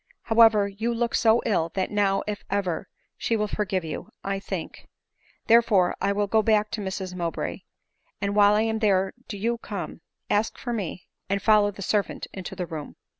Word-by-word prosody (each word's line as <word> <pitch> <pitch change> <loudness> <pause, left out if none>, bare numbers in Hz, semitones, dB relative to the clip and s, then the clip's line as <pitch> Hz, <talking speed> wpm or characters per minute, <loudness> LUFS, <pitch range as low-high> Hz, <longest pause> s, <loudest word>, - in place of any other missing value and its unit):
However, 225 -3 +5
you 215 +4 -2
look 235 0 -1
so 225 0 +4
ill, 175 -7 +1
that 190 -1 -1
now, 200 -2 +2
if 210 -1 -4
eyer, 195 -4 -1 0.3
she 230 - 0
will 210 -1 0
forgive 195 -3 -1
you, 155 - -6
I 195 0 -2
think; - - -6 0.6
therefore 225 -6 +4
I 200 - +2
will 205 +1 +1
go 220 +2 +3
back 215 -1 +2
to 215 - -3
Mrs 190 -1 -4
Mowbray; 170 -2 -3 0.6
and 200 0 -1
while 205 0 +6
I 215 - +3
am 220 0 0
there 195 -3 +2
do 205 - -5
you 230 +3 -1
come, 185 -7 -6 0.3
ask 210 +2 0
for 240 - -4
me, 190 -5 -4 0.2
and 200 +1 +1
follow 210 -1 +4
the 200 -1 -7
servant 205 +1 -1
into 190 -2 -6
the 180 - -3
room." 155 -3 -7
205 Hz, 185 wpm, -25 LUFS, 190-220 Hz, 0.6 s, while